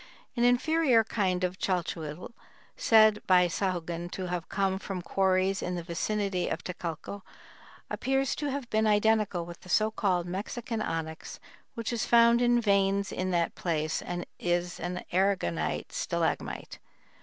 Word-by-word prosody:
An 240 - +1
inferior 250 0 +4
kind 190 -4 -1
of 180 +1 -2
chalchihuitl, 170 -1 -3 0.4
said 215 -2 +5
by 180 -1 +6
Sahagun 175 -1 -2
to 185 +1 -5
have 175 -1 -4
come 195 -1 0
from 190 -3 -5
quarries 190 0 +1
in 180 - -2
the 175 - -4
vicinity 190 +2 -1
of - - -3
Tecalco, 175 +2 -6 0.7
appears 270 0 0
to 295 - -2
have 275 -2 -4
been 220 0 +2
identical 210 -4 +2
with 170 0 -10
the 185 - -14
so 215 +4 +3
called 185 -5 0
"Mexican 215 +5 -4
onyx" 160 -4 -4 0.4
which 230 +1 -3
is 235 - -1
found 235 0 +6
in 240 0 +4
veins 200 -2 +2
in 185 0 -2
that 170 -2 +1
place 155 -2 -1
and 175 0 -4
is 175 0 -1
an 180 +1 -4
aragonite 175 - 0
stalagmite. - - -2
190 Hz, 145 wpm, -29 LUFS, 175-220 Hz, 0.7 s, by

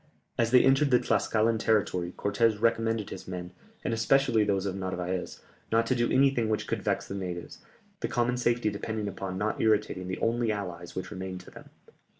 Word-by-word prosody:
As 115 -2 +1
they 125 +1 +6
entered 135 +2 +4
the 125 - +6
Tlascalan 110 -1 +1
territory 100 -6 +1
Cortès 105 +1 +1
recommended 115 -1 +1
his - - -8
men, 90 -1 -6 0.3
and - - -1
especially 115 0 +3
those 100 -2 0
of 95 -1 -2
Narvaez, 95 -1 -3 0.3
not 115 +1 +3
to 130 - +1
do 120 -1 +1
anything 130 -4 +3
which 110 - 0
could - - -2
vex - - -1
the - - -5
natives, 90 -3 -5 0.4
the - - -1
common 120 +1 0
safety 120 -3 +1
depending 105 +1 -3
upon 95 -1 -4
not 110 +3 -1
irritating 105 -4 +1
the 95 - -3
only 115 0 +1
allies 90 -4 -5
which 95 - -5
remained 95 -2 -5
to - - -14
them. - - -13
110 Hz, 185 wpm, -28 LUFS, 95-115 Hz, 0.4 s, they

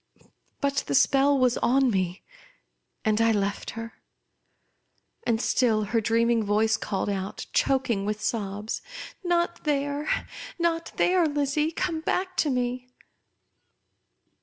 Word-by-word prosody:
But 280 0 0
the 140 - 0
spell 275 - +4
was 255 -2 +2
on 265 0 +3
me, 185 -2 -1 0.8
and 215 0 +2
I 230 0 +4
left 200 -1 -1
her; 230 0 -8 1.3
and 230 -2 +2
still 225 -3 +2
her 225 +2 0
dream 230 +2 +2
ing 230 -2 +2
voice 215 +2 +2
called 195 -2 -3
out, 195 -1 -3
choking 260 - +1
Avith 210 0 -2
sobs, 210 -1 -3 0.2
" - - -15
Not 345 -1 0
there! 290 0 -1 0.5
not 335 -1 0
there, 360 -2 +3
Lizzie! 290 +1 0
Come 335 -1 -2
back 370 +3 -1
to 305 - +2
me 250 -1 -1
245 Hz, 130 wpm, -26 LUFS, 215-295 Hz, 1.3 s, spell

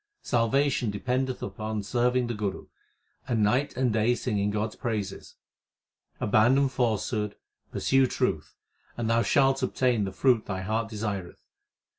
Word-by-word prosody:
Salvation 125 +1 +1
dependeth 125 +5 -2
upon 110 -1 -4
serving 125 +3 +1
the 120 - -3
Guru, 105 -3 -3 0.6
and 115 -4 +1
night 125 +6 +1
and 125 -3 +1
day 110 +3 +2
singing 105 -5 -1
God 105 +1 -1
s - - -15
praises. 105 -4 -4 0.8
Abandon 125 +6 +3
falsehood, 110 -4 -1 0.4
pursue 135 -1 +3
truth, - - -2 0.4
And 120 -2 -2
thou 115 +1 +3
shalt 135 +1 +3
obtain 125 -4 +1
the 95 - -4
fruit 120 +2 +2
thy 95 -2 -3
heart 110 +3 -1
desireth. 105 -4 -5
115 Hz, 135 wpm, -27 LUFS, 105-125 Hz, 0.8 s, Abandon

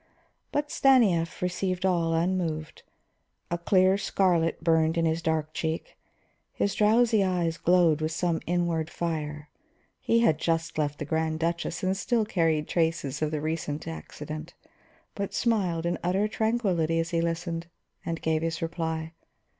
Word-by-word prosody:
But 290 0 -1
Stanief 200 -13 +3
received 180 +1 -1
all 170 -3 +2
unmoved. 165 -2 -1 0.7
A 175 - +1
clear 185 +2 +3
scarlet 175 -5 +1
burned 160 0 +3
in 165 - +2
his 160 +1 0
dark 155 -1 -1
cheek, 160 0 -3 0.6
his 200 - -1
drowsy 220 0 +4
eyes 175 -3 0
glowed 170 -3 +4
with 155 0 -1
some 165 0 0
inward 170 -2 0
fire. 150 -3 -4 0.5
He 230 0 +2
had 160 -9 +3
just 165 -1 -1
left 145 -1 -1
the 150 - -4
Grand 160 +1 -1
Duchess 170 +1 -2
and 185 +1 +1
still 225 +2 0
carried 165 -6 +1
traces 160 -5 -1
of 155 - +1
the 150 -1 -3
recent 155 -1 -3
accident, 155 0 -7 0.6
but 200 -1 -3
he - - -9
smiled 185 -8 +1
in 175 - -1
utter 190 +4 +1
tranquillity 200 -8 0
as 165 +1 -2
he 165 -1 +1
listened, 170 0 -2 0.4
and 165 -1 -4
gave 160 -1 +1
his 165 0 -2
reply. 160 -1 -3
165 Hz, 150 wpm, -27 LUFS, 160-185 Hz, 0.7 s, drowsy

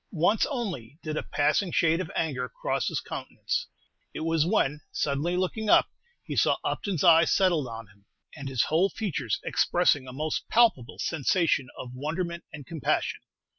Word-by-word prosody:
Once 190 +5 +2
only 180 - -4
did 155 -1 -3
a - - -1
passing 150 +6 +1
shade 165 +2 +2
of 160 - -5
anger 130 -6 -1
cross - - -2
his - - -1
countenance. - - -4 0.5
It - - -4
was 165 0 +1
when, 150 -7 +1
suddenly 150 +5 -1
looking 210 +4 -1
up, - - +6 0.3
he - - -5
saw - - +4
Upton's 190 -8 -2
eyes 165 -2 +6
settled 175 -8 +3
on 115 -1 -7
him, 100 0 -25 0.3
and 140 -3 -6
his 130 -3 +2
whole 170 +5 +2
features 150 - -2
expressing 145 -7 +2
a - - -7
most 150 +4 -3
palpable 220 - +3
sensation 160 -2 +1
of 125 - -7
wonderment 170 +6 -4
and 145 -3 -9
compassion. 160 -1 -1
160 Hz, 165 wpm, -27 LUFS, 135-180 Hz, 0.5 s, up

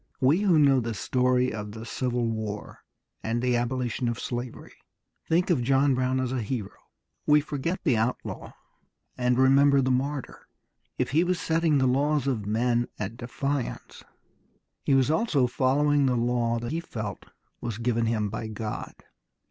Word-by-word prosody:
We 140 +7 +4
who 195 -5 +3
know 140 -3 +5
the 115 -2 -3
story 125 +4 +1
of 105 -1 -6
the 110 +1 -8
Civil 125 0 -1
War 110 -2 -4 0.4
and 115 +2 -1
the 125 0 +1
abolition 120 0 -1
of 120 - -3
slavery 120 -1 -5 0.6
think 175 +3 +2
of 150 -8 +2
John 135 +2 +3
Brown 130 +1 0
as 130 -1 -1
a 130 -2 -1
hero. 110 -2 -4 0.5
We 150 0 +6
forget 150 +4 -3
the 130 -9 +3
outlaw 115 +3 -3 0.6
and 125 -1 +1
remember 140 +2 +5
the 130 -1 +2
martyr. 135 +2 -3 0.5
If - - -1
he 160 +5 +4
was 180 -1 0
setting 160 -2 +2
the 130 - +2
laws 140 +2 +2
of 115 -7 -1
men 120 +2 +1
at 105 +2 -4
defiance 130 +2 -4 0.8
he 140 - +3
was 135 +2 +3
also 160 - +2
following 140 +3 +2
the 125 -1 +1
law 120 0 +1
that 120 +2 -4
he 165 - -1
felt 110 -11 -6 0.3
was 115 -3 -4
given 115 -1 0
him 110 -3 0
by 110 0 -4
God. 110 0 -5
125 Hz, 165 wpm, -27 LUFS, 115-140 Hz, 0.8 s, We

